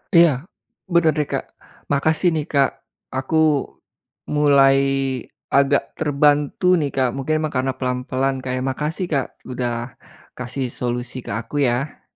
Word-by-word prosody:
Iya, 170 0 +8 0.6
benar, 165 -2 +5
deh, 150 - 0
Kak. - - -2 0.5
Makasih, 160 +5 +2
nih, 150 -2 -1
Kak. 140 -2 +3 0.4
Aku 130 +5 -1 1.0
mulai 140 -2 +5 0.8
agak 140 0 +4
terbantu, 145 +1 +2 0.2
nih, 145 - 0
Kak. 130 -2 +3
Mungkin, 155 +3 0
emang 155 -1 -2
karena 130 +1 +1
pelan-pelan, 130 +1 -1
Kak, 130 0 -4
ya. - - -2
Makasih, 150 +7 -2
Kak, 135 -3 +1 0.2
udah 120 -1 -3 0.4
kasih 125 +2 -3
solusi 120 +1 -3
ke - - -5
aku, 130 +6 -3
ya. 125 +5 -2
135 Hz, 135 wpm, -21 LUFS, 130-150 Hz, 1.0 s, Iya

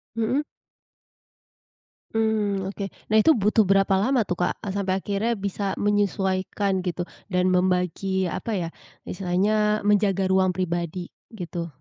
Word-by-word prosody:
Mmm. 230 +5 +1 1.7
Mmm, 205 -3 0
oke. 200 0 -5 0.3
Nah, 215 - +5
itu 320 +9 +5
butuh 210 -1 +3
berapa 195 0 +3
lama 245 +3 +2
tuh 180 -3 -4
Kak? 180 - +1
A 205 - -4
sampai 190 -1 -1
akhirnya 210 +4 0
bisa 200 -1 -3
menyesuaikan 195 -1 0
gitu 180 -1 -2 0.2
dan 185 -1 +1
membagi, 185 +1 +1
apa 230 - -4
ya, 175 -4 -2 0.4
istilahnya 210 +4 0
menjaga 205 -2 +2
ruang 190 -1 +3
pribadi, 175 -1 -3 0.2
gitu. 175 -3 -5
195 Hz, 125 wpm, -24 LUFS, 185-210 Hz, 1.7 s, Nah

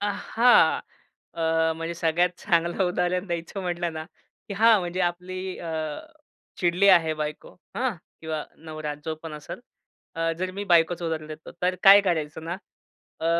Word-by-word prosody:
अ, 205 - -1
हां. 240 +4 +4 0.5
अ, 160 0 +1
म्हणजे 165 +1 -4
सगळ्यात 170 +1 +2
चांगलं 170 +2 +1
उदाहरण 180 +1 0
द्यायचं 170 +3 -4
म्हटलं 175 -2 -2
ना 155 0 -5 0.4
की 200 - -4
हां, 225 +1 +6
म्हणजे 175 +1 -3
आपली 185 +1 -3
अ 170 - -6 0.9
चिडली 180 +2 +3
आहे 165 -4 +5
बायको 150 0 -5 0.2
हं 245 -3 0 0.3
किंवा 160 -2 -4 0.2
नवरा 155 -1 -5
जो 160 - -2
पण 165 -2 -7
असेल. 150 +6 -8 0.5
अ, 165 0 0
जर 185 +1 -2
मी 200 +2 -5
बायकोच 175 -1 +3
उदाहरण 160 -2 -3
देतो 155 0 -10
तर 180 +1 +2
काय 200 +1 +9
करायचं 160 -4 -2
ना? 175 +2 -3 0.6
अ, 165 - -1
170 Hz, 155 wpm, -25 LUFS, 160-185 Hz, 0.9 s, काय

